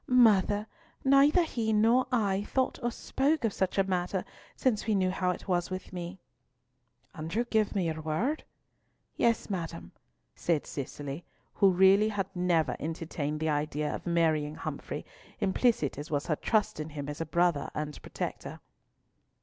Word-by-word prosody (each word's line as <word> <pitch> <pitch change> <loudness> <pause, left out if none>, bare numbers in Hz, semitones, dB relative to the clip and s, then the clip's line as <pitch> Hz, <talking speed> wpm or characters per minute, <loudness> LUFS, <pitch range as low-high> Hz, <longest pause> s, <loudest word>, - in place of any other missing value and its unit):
"Mother; 210 -4 +4 0.4
neither 280 +6 +6
he 230 -8 -1
nor 225 +4 +4
I 205 -6 +2
have 205 - -6
thought 260 -1 0
or 240 - +1
spoken 275 +3 0
of 215 - 0
such 190 0 -1
a 195 - +5
matter 185 0 -1 0.3
since 230 -5 0
we 215 - +3
knew 185 -1 +2
how 185 -1 0
it 180 - -3
was 175 -2 0
with 185 0 -6
me. 175 +1 -5 1.0
"And 160 -2 -6
you 235 +2 +1
give 220 -3 +1
me 190 -3 +1
your 160 -1 -2
word?" 200 - -1 0.7
"Yea, 235 -1 +4 0.2
madam," 165 - -4 0.4
said 165 -4 0
Cicely, 140 +3 -6 0.3
who 195 - +5
had 180 - -4
really 200 +3 +6 0.2
never 175 -3 +1
entertained 155 -1 -3
the 160 0 0
idea 150 0 -1
of - - -6
marrying 155 -3 +1
Humfrey, - - -5 0.3
implicit 190 - +1
as 145 - -6
was 145 -2 -1
her 155 - +1
trust 215 0 0
in 155 +1 -4
him 145 -2 -6
as 145 +2 -5
a - - -1
brother 170 -3 +1
and 150 -1 -4
protector. - - -5
180 Hz, 165 wpm, -30 LUFS, 155-220 Hz, 1.0 s, neither